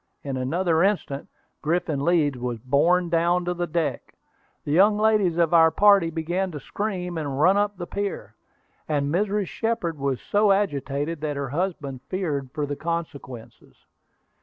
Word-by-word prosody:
In 140 -2 -4
another 160 +6 +1
instant 180 -8 0 0.3
Griffin 155 -3 -1
Leeds 160 -5 +2
was 120 -1 -3
borne 145 +9 +2
down 170 +1 +2
upon 175 0 -3
the 175 - 0
deck. 165 -1 -3 0.5
The 145 - -4
young 200 +6 +5
ladies 210 -5 +2
of 170 -1 +2
our 165 -1 +7
party 200 0 +5
began 170 +4 -2
to 150 - -5
scream 180 -2 -4
and 140 -3 -3
run 185 +6 +5
up 205 -1 0
the 175 - -5
pier; 200 +2 -4 0.6
and 145 -1 0
Mrs. 205 +2 +1
Shepard 205 -7 -2
was 135 -2 -1
so 205 0 +2
agitated 150 -5 -1
that 150 -2 -2
her 140 -2 -3
husband 145 -4 -3
feared 150 -8 -2
for 150 0 -2
the 145 0 -4
consequences. 150 -8 -6
165 Hz, 160 wpm, -24 LUFS, 145-190 Hz, 0.6 s, our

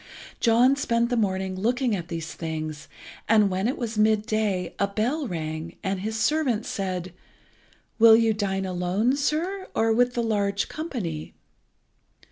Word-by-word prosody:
John 240 +3 +4
spent 235 -4 0
the - - +2
morning 190 -4 -1
looking 240 +4 0
at 170 -3 -5
these 165 -2 -5
things, 155 -2 -5 0.4
and 210 -3 +5
when 190 +3 0
it 255 - -1
was 230 -3 -3
midday 215 -3 +1
a 200 - +2
bell 245 +9 -1
rang, 160 -2 -5
and 190 -1 -1
his 220 +3 -3
servant 260 -6 +1
said 185 -3 -3 0.9
"Will 225 0 +9
you 225 -1 +3
dine 195 -2 -2
alone, 185 +7 0
sir, 330 +7 -1
or 225 0 +3
with 245 +2 +2
the 240 - 0
large 200 -3 0
company?" 210 - -5
215 Hz, 145 wpm, -25 LUFS, 185-235 Hz, 0.9 s, Will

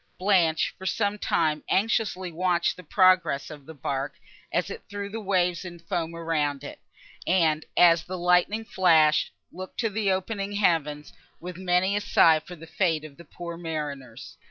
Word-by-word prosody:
Blanche, 180 -5 +2
for 190 - -5
some 205 +1 -1
time, 155 -5 0
anxiously 195 -3 0
watched 175 +1 0
the - - -11
progress 180 -5 +2
of 145 -3 -12
the 160 - -9
bark, 135 +1 -3 0.4
as 180 +3 -1
it - - -7
threw 200 -1 -5
the 225 +2 -6
waves 180 -3 0
in 175 -2 -8
foam 170 0 -4
around 150 -4 -1
it, 145 - -9 0.5
and, 160 -4 +2
as 170 -2 +6
the 185 +1 -6
lightnings 180 +5 +1
flashed, 160 -4 +4 0.2
looked 185 +1 -9
to 225 -3 0
the 205 -1 0
opening 195 +1 -3
heavens, 155 -7 0 0.3
with 180 +1 -8
many 185 +2 +1
a 205 - 0
sigh 160 -5 +4
for 180 +3 -11
the 165 0 -12
fate 165 -2 0
of 145 -2 -12
the 170 - -12
poor 170 +2 -8
mariners. 145 -8 -6
175 Hz, 170 wpm, -26 LUFS, 160-190 Hz, 0.5 s, as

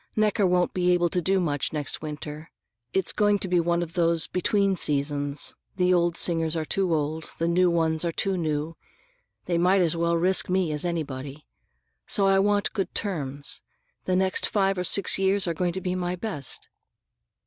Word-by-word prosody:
Necker 210 -2 +2
won't 180 0 +1
be 180 -1 +2
able 175 -1 +2
to 180 - -1
do 190 +2 +2
much 145 -6 -1
next 150 -3 -3
winter. 150 +1 -7 0.4
It's 190 -2 +1
going 205 -1 +3
to 190 - -3
be 180 -1 +2
one 170 +1 +1
of 165 -1 -8
those 170 -2 +1
between 195 +2 +1
seasons; 145 -2 0 0.2
the 180 -1 +2
old 170 -1 +2
singers 165 -2 +2
are 160 -1 -2
too 190 +2 0
old, 155 +1 -2
and - - -10
the 165 - 0
new 180 +1 +3
ones 160 -1 0
are 170 - 0
too 195 +3 -1
new. 155 -1 -2 0.7
They 170 -1 0
might 185 +3 +3
as 170 -2 +1
well 170 0 +1
risk 185 +3 +2
me 180 -3 +1
as 150 -1 0
anybody. 145 -4 -4 0.6
So 200 - +2
I 195 0 +4
want 205 +1 +1
good 195 -3 -3
terms. 145 -8 -3 0.4
The 185 - +1
next 190 +1 +1
five 195 -2 +1
or - - -1
six 195 +2 +2
years 195 0 +2
are 170 - 0
going 175 +1 -1
to 190 - -4
be 180 0 -2
my 180 -1 -2
best." 175 - -4
175 Hz, 190 wpm, -25 LUFS, 160-190 Hz, 0.7 s, I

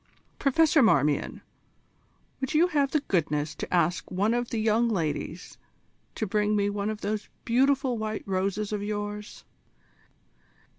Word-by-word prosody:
Professor 305 +2 +4
Marmion, 150 - +2 1.0
would 265 +2 -3
you 345 +4 +4
have 285 -4 +2
the 300 +1 +1
goodness 150 - -1
to - - -7
ask 175 0 +1
one 200 +5 +1
of 240 0 -1
the 230 - -3
young 220 +2 +2
ladies 165 -3 -3 0.6
to 220 - -2
bring 210 +1 +1
me 205 0 +1
one 205 +1 -2
of 215 -1 -5
those 210 +1 -3 0.2
beautiful 260 0 +2
white 215 0 -3
roses 195 +2 -1
of 210 - -2
yours?" 205 0 -5
210 Hz, 140 wpm, -27 LUFS, 195-240 Hz, 1.0 s, Professor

